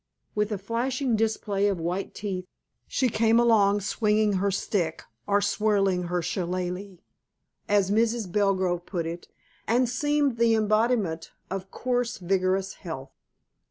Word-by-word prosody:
With 210 +1 0
a 210 - -1
flashing 240 +5 -1
display 210 -2 0
of 195 -4 0
white 175 +4 -3
teeth, 185 -3 -4 0.4
she 260 - +1
came 225 0 +3
along 205 -4 +4
swinging 210 +1 +1
her 200 - +2
stick, 180 -4 -1 0.2
or 205 0 +3 0.2
whirling 195 -4 +2
her 175 0 -1
shillalah, 180 +2 -3 0.7
as 200 -1 +3
Mrs. 225 -2 +1
Belgrove 190 -3 +1
put 170 -4 -2
it, 170 +1 -6 0.4
and 245 +3 +3
seemed 290 +1 +1
the 230 -1 +4
embodiment 215 -5 +1 0.2
of 190 0 -4
coarse, 245 0 -1
vigorous 190 +1 0
health. 150 -7 -7
205 Hz, 130 wpm, -26 LUFS, 185-225 Hz, 0.7 s, along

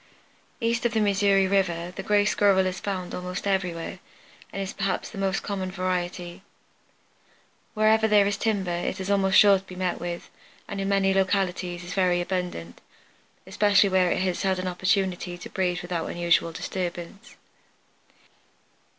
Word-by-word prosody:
East 230 -1 0
of 240 -2 +1
the - - +3
Missouri 200 -1 +3
River 180 -3 0
the - - -4
Gray 205 +1 +2
Squirrel 200 -2 +3
is 185 0 -2
found 185 -3 -4
almost 180 +1 -5
everywhere, 180 -3 -2 0.5
and - - -5
is 195 -1 -4
perhaps 195 -2 -2
the 200 - -8
most 195 0 -1
common 190 -2 -3
variety. 180 -1 -3 1.3
Wherever 220 +1 +4
there 210 -2 +5
is 200 0 0
timber 200 -4 -1
it 175 +2 -3
is 190 +1 -2
almost 195 -1 +3
sure 200 -2 +7
to - - -18
be 185 - -10
met 180 -1 -2
with, 175 0 -6 0.4
and 200 -2 -4
in 195 - -2
many 195 -1 +3
localities 185 -2 0
is 175 - -7
very 180 -2 +2
abundant, 175 - -4 0.6
especially 205 -1 +3
where 185 -1 +3
it - - 0
has 185 -2 -1
had 190 -1 +1
an 185 0 -3
opportunity 185 -1 -1
to 175 - -9
breed 180 -1 -1
without 175 -2 -3
unusual 170 -1 +1
disturbance. 175 +2 -6
190 Hz, 160 wpm, -26 LUFS, 180-200 Hz, 1.3 s, sure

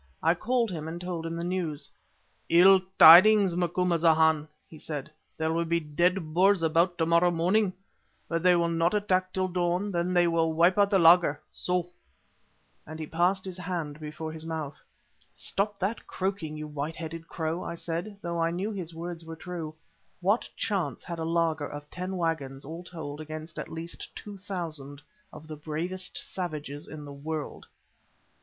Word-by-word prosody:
I 165 +1 +5
called 230 +4 0
him 160 -3 -5
and 165 +2 -5
told 175 -2 -4
him 165 - -4
the 170 - -4
news. 175 -4 -3 0.6
"Ill 185 +3 +7 0.2
tidings, 190 +3 +9
Macumazahn," 165 -3 +3 0.2
he 155 - -13
said; 150 -1 -5 0.3
"there 160 0 0
will 170 +1 +1
be 170 0 +1
dead 165 +2 0
Boers 190 +1 +4
about 170 +2 +2
to 160 - +1
morrow 170 +2 +4
morning, 180 +4 +2 0.6
but 165 0 -1
they 180 0 +5
will 170 -1 +2
not 170 +3 +1
attack 185 -3 +1
till 185 0 0
dawn, 180 +2 0
then 175 0 0
they 175 -1 +4
will 165 -1 +1
wipe 170 +3 +4
out 200 0 +5
the 200 - +4
laager 165 -4 +6
so!" 180 -1 -1 1.0
and 155 +1 -7
he 155 - -4
passed 180 +5 +1
his 185 -1 -7
hand 165 -5 -4
before 155 +1 -6
his 160 0 -8
mouth. 160 -3 -5 0.5
"Stop 205 +1 -1
that 200 +4 -3
croaking, 185 -5 -3
you 155 - -5
white 150 +1 -4
headed 165 0 -7
crow," 165 +1 -3
I - - -5
said, 175 +5 -4
though 170 -1 -2
I 165 - +2
knew 185 +6 -2
his 175 -5 -6
words 170 0 -6
were 165 0 -8
true. 165 -2 -6 0.4
What 200 +6 +1
chance 180 - -2
had 170 -1 -6
a 160 - -2
laager 165 -3 0
of 145 +1 -8
ten 185 +1 -4
waggons 145 -6 -2
all 165 +4 -7
told 155 -4 -7
against 155 +1 -7
at - - -6
least 165 +1 -7
two 205 -1 -8
thousand 160 -8 -6 0.3
of 155 - -11
the 155 0 -7
bravest 165 +5 -3
savages 150 -5 -5
in 150 -1 -8
the 145 - -9
world? 150 +2 -5
170 Hz, 175 wpm, -28 LUFS, 155-180 Hz, 1.0 s, tidings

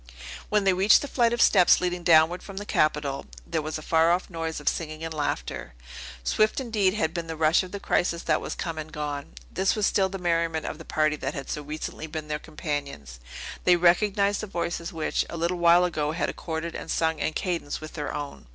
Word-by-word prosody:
When 210 -1 +2
they 195 -1 +4
reached 190 +8 +5
the - - -4
flight 240 -4 +2
of 240 0 +3
steps 180 -4 +6
leading 180 -1 -1
downward 165 +1 +5
from 195 -1 -10
the 205 - -4
Capitol, 150 -6 0 0.2
there 165 -2 -1
was 155 +1 -4
a 155 - -9
faroff 170 +4 +2
noise 165 -2 -3
of 150 - -13
singing 155 -1 -2
and 165 - -4
laughter. 145 - -3 0.5
Swift, 215 - +2
indeed, 215 -6 +1
had 160 -6 0
been 170 -1 -4
the 160 - -4
rush 155 +1 +4
of 185 -1 -8
the 200 - -5
crisis 170 -3 0
that - - +1
was - - -4
come 165 -2 -4
and 155 0 -7
gone! 145 -2 -5 0.2
This 190 +1 +1
was 210 -2 +1
still 190 -1 +2
the 195 - -5
merriment 165 -3 0
of 155 - -5
the 160 - -10
party 155 0 +1
that 135 0 -4
had 140 -2 -5
so 150 - -3
recently 155 +1 -6
been 155 -1 -6
their 150 0 -2
companions. 145 - -5 0.4
They 180 - +6
recognized 200 +4 +3
the 215 - -5
voices 170 -2 -3
which, 160 -2 -1
a 170 - -5
little 170 +2 -1
while 170 +1 +6
ago, 155 -3 -1
had 170 - -1
accorded 165 0 -4
and - - -7
sung 160 -1 0
in 155 - -1
cadence 170 -4 -2
with 155 0 -9
their 150 -2 -4
own. 145 - -6
165 Hz, 220 wpm, -26 LUFS, 155-180 Hz, 0.5 s, steps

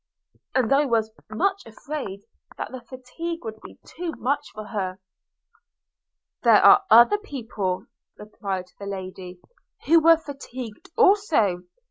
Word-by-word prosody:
I 275 +4 +3
was 225 -4 0 0.2
much 390 - 0
afraid 220 -4 -6 0.4
that - - -5
the 255 -1 -7
fatigue 260 +7 -7
would 220 -1 -7
be - - -13
too 345 -2 -6
much 285 +3 -2
for 215 - -8
her.' 190 -3 -4 1.4
'There - - +6
are 400 0 +8
other 240 - +7
people,' 225 - -4 0.3
replied 195 -3 -6
the 200 - -7
lady, 185 -2 -7 0.5
'who 330 +2 +6
were 330 +1 +6
fatigued 260 -7 -9
also. 325 - +3
240 Hz, 120 wpm, -24 LUFS, 200-315 Hz, 1.4 s, are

